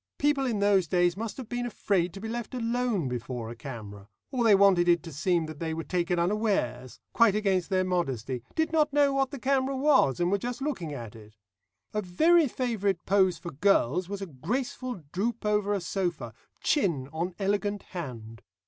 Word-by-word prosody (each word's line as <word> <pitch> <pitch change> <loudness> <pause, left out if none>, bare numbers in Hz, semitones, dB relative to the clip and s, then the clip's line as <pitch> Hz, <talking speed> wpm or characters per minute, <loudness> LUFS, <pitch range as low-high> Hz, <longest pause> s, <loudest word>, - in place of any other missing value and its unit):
People 285 -2 +2
in 230 -4 0
those 200 -3 +3
days 175 +1 +2
must 220 +2 -5
have 260 -4 -7
been 245 +1 -3
afraid 190 -6 0
to - - -7
be 220 - -6
left 240 +3 -5
alone 235 - 0
before 120 -2 -4
a - - -8
camera, 105 -5 -9 0.2
or 255 -3 0
they 220 -3 +6
wanted 190 -3 +5
it 170 -2 +4
to 165 - -9
seem 170 +2 +1
that 155 -1 -9
they 160 -1 -2
were 165 - -4
taken 175 0 -1
unawares, 175 - -1
quite 230 -4 +5
against 195 -4 +1
their 185 -1 +2
modesty 135 -9 -2
did 320 0 +1
not 305 -2 +3
know 285 -1 +3
what 270 -1 +1
the 280 - -7
camera 270 +1 0
was, 265 - +3
and 175 +1 +1
were 200 - +2
just 245 +4 -4
looking 270 - -3
at 120 -7 -7
it. 110 -1 -15 0.6
A 210 - 0
very 315 - +4
favourite 210 -8 -1
pose 190 -2 +3
for 175 - -7
girls 180 +1 +2
was 200 -1 -4
a - - -3
graceful 240 - -4
droop 220 +4 -2
over 210 -1 +1
a 205 - +1
sofa, 175 - -3 0.3
chin 170 - +1
on 170 +3 -3
elegant 205 0 -1
hand. 115 - -8
195 Hz, 195 wpm, -28 LUFS, 165-235 Hz, 0.6 s, they